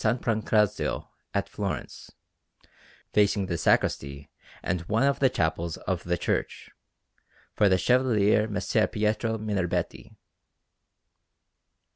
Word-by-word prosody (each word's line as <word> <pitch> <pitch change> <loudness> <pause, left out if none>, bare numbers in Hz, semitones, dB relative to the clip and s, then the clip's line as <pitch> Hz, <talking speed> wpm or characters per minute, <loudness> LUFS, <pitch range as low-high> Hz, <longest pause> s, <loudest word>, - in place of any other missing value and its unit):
Pancrazio 110 -3 0 0.2
at - - -1
Florence, - - -5 1.0
facing 100 -1 +3
the 90 - -2
sacristy 70 -3 0 0.3
and 90 - -1
one 110 +4 +2
of 140 0 +2
the 135 - +4
chapels 80 -6 -1
of 95 -3 -3
the 90 0 0
church, - - -3 0.8
for 105 - +3
the 95 - +4
Chevalier 110 -1 +3
Messer 105 +1 +1
Pietro 110 +1 -1
Minerbetti. 100 -5 -3
105 Hz, 100 wpm, -27 LUFS, 90-110 Hz, 1.0 s, the